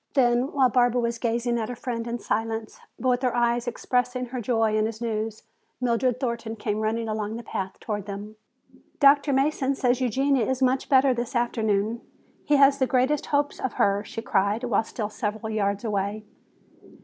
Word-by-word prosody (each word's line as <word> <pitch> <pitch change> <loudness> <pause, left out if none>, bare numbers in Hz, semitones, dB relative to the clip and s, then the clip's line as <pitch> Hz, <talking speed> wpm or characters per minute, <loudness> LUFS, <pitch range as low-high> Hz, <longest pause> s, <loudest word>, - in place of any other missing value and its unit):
Then 245 0 +3
while 270 -2 +4
Barbara 245 0 +2
was 235 -1 -1
gazing 235 0 0
at 220 - -3
her 245 - -4
friend 240 -2 -4
in 235 +1 -2
silence, 225 -1 -3 0.2
but 260 - -2
with 250 0 +2
her 250 -2 0
eyes 240 0 +1
expressing 250 +1 -1
her 250 0 -5
joy 225 -2 +1
in 215 0 +2
his 220 -1 -6
news, 220 -2 -3 0.4
Mildred 250 0 +1
Thornton 235 -3 -3
came 210 -1 -2
running 225 +1 -1
along 215 0 -3
the 235 - -6
path 190 -3 -5
toward 205 -2 -4
them. 205 +2 -7 0.6
"Dr. 280 0 +5
Mason 275 0 +1
says 250 0 +1
Eugenia 265 +1 +2
is 260 -1 0
much 260 0 +1
better 265 -1 +5
this 240 +1 -4
afternoon. 225 -1 0 0.4
He 295 - +3
has 275 0 +5
the 260 - +2
greatest 260 +4 +1
hopes 290 0 0
of 260 - -2
her," 200 0 +2
she 225 +1 -7
cried, 205 +2 +1
while 230 -3 +1
still 215 -1 -5
several 220 +1 -3
yards 200 -1 -1
away. 205 -1 -2
235 Hz, 185 wpm, -25 LUFS, 220-255 Hz, 0.6 s, Dr